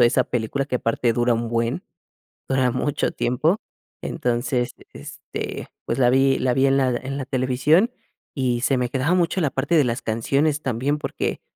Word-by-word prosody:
viendo - - +8
esa 120 - +3
película 125 +4 -2
que 125 - -1
aparte 115 0 0
dura 120 0 +2
un 115 0 -2
buen, 115 0 -1 0.6
dura 130 -2 +2
mucho 135 +3 -1
tiempo. 150 - +1 0.4
Entonces, 120 +1 -1 0.2
este, - - -7 0.2
pues, 115 - -2
la 125 -2 +4
vi 135 +1 +4
la 125 -1 +1
vi, 135 +1 +3
en 135 0 +3
la 130 -1 +3
en 135 +3 -4
la 135 - -4
televisión, 135 - +2 0.4
y 125 -4 0
se 130 +1 +2
me 125 -1 0
quedaba 135 +8 +1
mucho 180 +1 +1
la 150 - +2
parte 140 +6 0
de 155 - +6
las 120 -1 -1
canciones 140 +7 0
también, 135 +4 -1
porque - - -3
130 Hz, 180 wpm, -23 LUFS, 120-140 Hz, 0.6 s, viendo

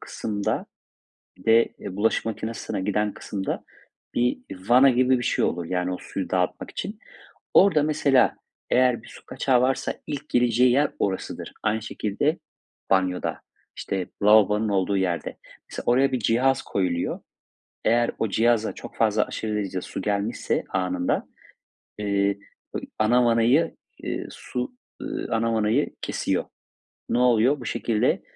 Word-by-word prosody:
kısımda, 105 -2 -3 0.7
bir 90 - -17
de, 115 +1 +6
eee, 95 - -7
bulaşık 110 +2 +1
makinesine 110 -2 -4
giden 105 +1 0
kısımda 100 -3 -4 0.5
bir 125 +1 +1 0.3
vana 130 +3 +7
gibi 130 +1 +3
bir - - -4
şey - - +1
olur, 85 - -1
yani, 90 +1 -1
o 90 - -4
suyu 95 -2 -5
dağıtmak 90 -1 -1
için. 210 +2 -5 0.6
Orada, 185 -7 +6
mesela, 145 -3 +3 0.3
eğer 125 -2 +3
bir - - -14
su - - -14
kaçağı 130 -1 +1
varsa 130 +1 0
ilk 145 -2 -5
gireceği 125 +1 +3
yer 140 +4 +3
orasıdır. 95 -2 -3
Aynı 110 +1 0
şekilde 110 - -1 0.5
banyoda, 95 -1 +1 0.4
işte, 95 -2 -3 0.2
lavabonun 105 +1 +5
olduğu 100 0 +1
yerde. 90 -3 -1 0.3
Mesela, - - -6
oraya 130 +2 +3
bir 130 - +1
cihaz 125 +4 +2
koyuluyor. 90 -3 -1 0.6
Eğer 120 +1 +3
o 110 - 0
cihaza 115 +1 +2
çok - - -11
fazla, 110 -1 +3
aşırı 110 -1 -4
derecede 95 -3 -2
su - - -6
gelmişse 105 +2 -1
anında, 90 -1 -1 0.7
eee, 100 -1 +1 0.4
bö - - -1 0.2
ana 120 +3 +4
vanayı, 120 +8 +3 0.3
ııı, - - -3
su, 125 - -5 0.3
ııı, - - -4
ana 115 0 +1
vanayı 110 +6 +1
kesiyor. - - -1 0.6
Ne - - +1
oluyor? 125 +3 +4
Bu 120 - -7
şekilde 115 -2 0
110 Hz, 140 wpm, -25 LUFS, 100-125 Hz, 0.7 s, vana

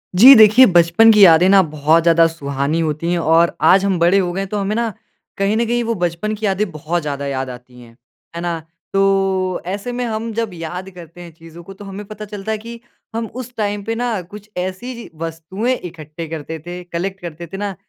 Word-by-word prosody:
जी, 255 +9 +10
देखिए 220 +3 +8
बचपन 175 +3 +5
की 210 -2 +6
यादें 170 +1 +6
ना 195 0 +6
बहुत 155 0 +1
ज़्यादा 165 0 +5
सुहानी 140 -1 -3
होतीं 155 +1 -2
हैं 175 - 0
और 165 +1 +3
आज 195 +1 +5
हम 190 -3 +1
बड़े 175 +3 +4
हो 180 -2 0
गए 195 - -2
हैं 195 - -5
तो 210 - -3
हमें 200 +1 -2
ना 230 -2 -1 0.4
कहीं 195 +2 +1
न 235 - +1
कहीं 240 +1 0
वो 230 0 -1
बचपन 175 +5 -2
की 215 +1 -5
यादें 200 +1 0
बहुत 160 +3 -3
ज़्यादा 140 -2 -4
याद 135 -1 -3
आतीं 125 0 -12
हैं। 115 -1 -16 0.4
है 170 - -4
ना? 170 -1 -2 0.3
तो 195 -2 +1
ऐसे 200 +6 -4
में 245 0 -3
हम 225 0 -4
जब 225 -1 -2
याद 180 +3 -6
करते 175 -1 -13
हैं 170 -1 -10
चीज़ों 165 +1 -14
को 195 - -11
तो 200 +1 -12
हमें 195 +1 -8
पता 215 +1 -9
चलता 205 +1 -6
है 220 - -1
कि 230 +2 -10 0.4
हम 230 0 -2
उस 250 -1 -7
टाइम 205 -1 -2
पे 225 +2 -3
ना 235 -4 -2
कुछ 205 +4 -13
ऐसी 185 +8 -4
ची 235 - -10
वस्तुएँ 165 +9 -3
इकट्ठे 160 -3 -9
करते 160 0 -6
थे, 175 +3 -8
कलेक्ट 180 +2 -5
करते 170 0 -8
थे 195 - -8
ना 200 -1 -4
185 Hz, 225 wpm, -18 LUFS, 165-210 Hz, 0.4 s, जी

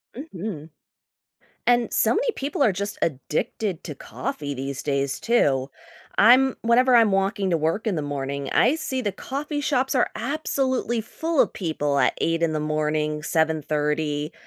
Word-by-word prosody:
Mhm. 190 - -6 1.0
And 240 -1 +3
so - - +3
many - - +1
people 280 +1 -2
are 210 - +4
just 200 +2 -4
addicted 165 - -2
to 150 - -6
coffee 145 - -5
these 135 +1 -5
days, 140 -1 -1
too. 140 - +2 0.5
I'm 255 +5 +6
Whenever 245 +2 +4
I'm 225 -4 +5
walking 195 0 0
to 170 - +3
work 165 +9 -1
in 205 - +1
the 155 - -2
morning, 140 -1 -4
I 255 +6 +4
see 265 -5 -3
the 205 -5 -2
coffee 290 - -4
shops 265 -2 0
are 250 - +2
absolutely 260 -2 -1
full 320 +7 -1
of - - +3
people 150 -6 -1
at 125 - +3
8:00 165 0 0
in 160 -1 +2
the 155 - -1
morning, 150 0 -1
7:30, 150 -1 0
180 Hz, 160 wpm, -24 LUFS, 150-245 Hz, 1.0 s, I'm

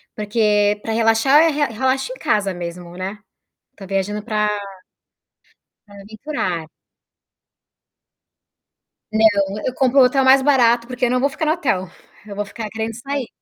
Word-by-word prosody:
porque 210 -1 +1
pra 225 - -4
relaxar 230 +6 +4
eu 330 - +3
re 295 0 +1
relaxo 260 - -1
em - - -10
casa 200 -3 0
mesmo, 175 0 -8
né. 190 +3 -6 0.6
Tô 195 - -10
viajando 195 +2 -2
pra 210 -1 -1 1.4
pra 205 - -16
aventurar. 200 - -5 2.5
Não, 205 -2 +2
eu 255 - -1
compro 265 +1 +2
o - - +8
hotel 270 +2 +2
mais 265 +1 +6
barato, 240 -4 +3
porque 250 0 -2
eu 240 - 0
não 250 - +1
vou 280 - +2
ficar 315 - -4
no 305 - +2
hotel, 245 - -1 0.4
eu 205 - -9
vou 205 +1 -3
ficar 215 +1 -7
querendo 220 +1 -4
sair. 265 +2 -4
220 Hz, 150 wpm, -20 LUFS, 205-260 Hz, 2.5 s, o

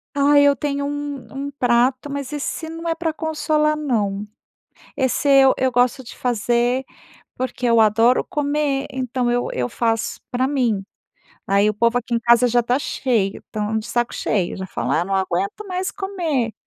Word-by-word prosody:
Ah, 285 +1 +5
eu 285 0 +5
tenho 280 +1 -2
um 290 0 -4 0.3
um - - -6
prato, 255 +1 +1
mas 280 -1 -5
esse 295 +2 -4
não 330 +1 -6
é 330 - 0
pra 325 -1 -2
consolar 305 -1 0
não. 210 -9 -1 0.7
Esse 265 +2 +1
eu 270 -1 +6
eu 260 0 +1
gosto 245 +2 +2
de 235 - -11
fazer 245 +2 0 0.5
porque 255 -1 -3
eu 230 -1 +4
adoro 225 +4 +4
comer 285 -1 -1
então, 255 -1 -1
eu 245 0 0
eu 125 -1 -2
faço 225 -1 -1
pra 255 +1 0
mim. 245 -8 0 0.6
Aí 200 +2 +3
o 215 - -5
povo 235 +3 +2
aqui 240 0 -4
em 235 - +3
casa 235 +1 +5
já 240 +1 +3
está 245 +2 +1
cheio 230 -8 -1
estão 215 +1 -3
de 220 - -6
saco 240 0 -1
cheio, 190 -5 -1
já 190 - -5
fala: 130 -3 -1
“Ah - - -3
não 195 +1 -2
aguento 190 - -2
mais 370 +1 -2
comer”. 335 - -2
250 Hz, 175 wpm, -21 LUFS, 230-285 Hz, 0.7 s, eu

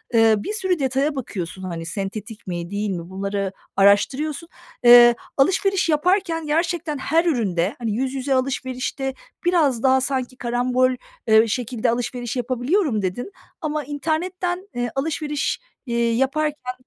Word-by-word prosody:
ııı, 220 -2 +4
bir - - -3
sürü 375 -5 0
detaya 275 +2 0
bakıyorsun, 190 -8 -5
hani, 170 -3 -5
sentetik 205 +4 -6
mi 175 0 -4
değil 205 +1 -2
mi, 175 -2 -4
bunları 195 0 -2 0.2
araştırıyorsun. 275 - +2 0.4
Iıı, 240 0 +9 0.2
alışveriş 385 +5 +2
yaparken 330 +1 +1
gerçekten 325 -1 0
her 325 +5 +1
üründe, 205 - 0
hani: 230 -3 -2
"Yüz 255 +5 -1
yüze 270 0 -1
alışverişte 260 +1 -2 0.3
biraz 295 -9 +2
daha 265 0 +4
sanki 255 -1 -2
karambol, 250 +1 +1 0.4
ııı, 220 +1 +6
şekilde 240 0 -1
alışveriş 240 +1 -2
yapabiliyorum." 255 - 0
dedin 200 - -3 0.3
ama 305 -1 -2
internetten, 355 +6 -2
eee, 245 0 -2
alışveriş, 295 0 -1 0.3
eee, 235 -1 +1
yaparken, 270 +1 -1
255 Hz, 130 wpm, -22 LUFS, 225-305 Hz, 0.4 s, Iıı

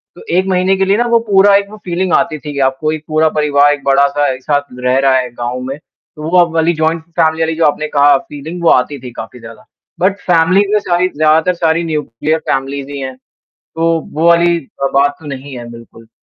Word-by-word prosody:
तो - - -14 0.2
1 185 - +2
महीने 185 0 +2
के 195 - +1
लिए 195 +2 +2
ना 240 - +1
वो 235 0 +3
पूरा 200 0 +5
एक 200 0 +1
वो 215 - -10
फ़ीलिंग 180 0 -1
आती 155 - +1
थी 150 0 -7
कि 140 - -4
आपको 145 +4 -3
एक 155 -1 -5
पूरा 155 0 +2
परिवार 145 -1 +3
एक 145 -1 -7
बड़ा-सा 140 +1 +2
एक 130 0 -11
साथ 145 0 +1 0.2
रह 125 +1 +2
रहा 135 -1 +3
है 125 -1 -2
गाँव 120 +1 -4
में 135 - -5
तो 150 -1 -17
वो 175 0 +5
वाली 165 +1 +2
जॉइंट 160 0 -1 0.2
फैमिली 160 0 +2
वाली 160 0 -1
जो 165 - +1
आपने 150 +1 0
कहा 145 -1 +4
फीलिंग 155 +6 -9
वो 170 - +4
आती 135 +2 +2
थी 125 - -8
काफ़ी 125 - -11
ज़्यादा 115 -1 -13 0.3
बट 195 +2 +1
फ़ैमिलीज़ 185 +4 +2
में 210 - +4
सारी 180 -2 0
ज़्यादातर 155 +4 +3
सारी 165 0 0
न्यूक्लियर 155 -1 -2
फ़ैमिलीज़ 135 +2 -2
ही 140 - -6
हैं 130 -1 -5 0.4
तो 165 0 -2 0.2
वो 160 +3 0
वाली 170 0 +4 0.3
अ, - - +3
बात 140 +1 +2
तो 160 - -13
नहीं 135 -1 -7
है, 120 -1 -9
बिल्कुल। 115 -1 -14
155 Hz, 225 wpm, -14 LUFS, 140-170 Hz, 0.4 s, पूरा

